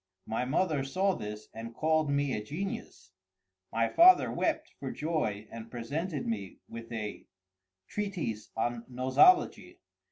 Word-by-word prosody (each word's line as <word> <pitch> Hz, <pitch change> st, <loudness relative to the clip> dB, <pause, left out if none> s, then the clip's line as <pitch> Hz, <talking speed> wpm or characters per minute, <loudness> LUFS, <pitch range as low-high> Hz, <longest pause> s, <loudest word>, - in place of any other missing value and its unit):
My 110 Hz, +3 st, -1 dB
mother 150 Hz, +1 st, +1 dB
saw 190 Hz, +8 st, +1 dB
this 105 Hz, -8 st, -6 dB
and 115 Hz, +1 st, -7 dB
called 155 Hz, -1 st, +2 dB
me 140 Hz, -1 st, +1 dB
a 105 Hz, -, -2 dB
genius—my 95 Hz, -, -5 dB
father 360 Hz, +2 st, +7 dB
wept -, -, -1 dB
for -, -, -4 dB
joy 130 Hz, -10 st, -2 dB
and 115 Hz, 0 st, -8 dB
presented 140 Hz, +6 st, -3 dB
me 100 Hz, -5 st, -3 dB
with 115 Hz, +1 st, -9 dB
a 110 Hz, -2 st, -5 dB, 0.6 s
treatise 175 Hz, -, -3 dB
on 120 Hz, +1 st, -1 dB
Nosology. 130 Hz, -, +4 dB
120 Hz, 125 wpm, -30 LUFS, 110-155 Hz, 0.6 s, father